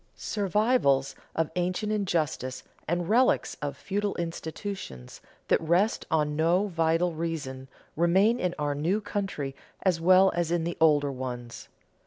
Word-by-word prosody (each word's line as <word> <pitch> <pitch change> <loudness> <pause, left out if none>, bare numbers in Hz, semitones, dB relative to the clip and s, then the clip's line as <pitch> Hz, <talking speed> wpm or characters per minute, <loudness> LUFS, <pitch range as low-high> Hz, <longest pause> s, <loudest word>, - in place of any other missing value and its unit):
Survivals 200 - +1 0.2
of 160 -1 0
ancient 185 +4 -1
injustice 160 - -1 0.2
and 175 +1 -1
relics 245 +5 +3
of 145 -1 -3
feudal 205 +1 -2
institutions 165 - -6 0.3
that - - +3
rest 175 +7 +1
on 150 -2 +1
no 175 +6 +2
vital 165 0 +1
reason 150 -5 -4 0.3
remain 190 +8 +3
in 180 -1 -1
our 145 -1 -1
new 165 +9 0
country 195 -10 -4 0.3
as 180 -4 +2
well 185 +2 +6
as 175 -1 -1
in 170 -1 +1
the 170 +1 -3
older 145 -3 +4
ones. 125 -2 -6
170 Hz, 135 wpm, -27 LUFS, 150-195 Hz, 0.3 s, well